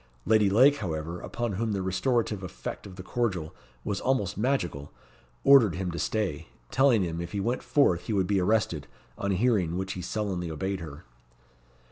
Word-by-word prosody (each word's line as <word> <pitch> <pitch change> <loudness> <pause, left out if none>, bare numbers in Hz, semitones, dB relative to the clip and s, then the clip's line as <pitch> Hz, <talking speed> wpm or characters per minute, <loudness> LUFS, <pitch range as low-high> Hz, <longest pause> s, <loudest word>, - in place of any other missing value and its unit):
Lady 105 -2 +4
Lake, 130 +8 +5
however, 85 - -4
upon 120 -2 -3
whom 110 +2 -1
the 95 -2 -2
restorative 110 +2 0
effect 95 +2 -7
of 95 - -11
the 90 - -8
cordial 95 -9 -2 0.3
was 100 -2 -2
almost 105 -7 0
magical, 105 - -1 0.5
ordered 130 -9 +6
him 90 -1 -2
to 85 - -5
stay, 105 -10 -2 0.2
telling 130 -6 +4
him 85 -1 -3
if 85 0 -7
he 100 - -1
went 120 +6 -1
forth 90 - +2
he 110 - -1
would 95 -2 +2
be 95 0 +1
arrested, 90 -7 +1 0.3
on 100 - -3
hearing 95 -4 +1
which 95 +1 -3
he 90 - -6
sullenly 90 -2 -3
obeyed 95 +5 -3
her. 80 -4 -9
95 Hz, 175 wpm, -28 LUFS, 90-110 Hz, 0.5 s, ordered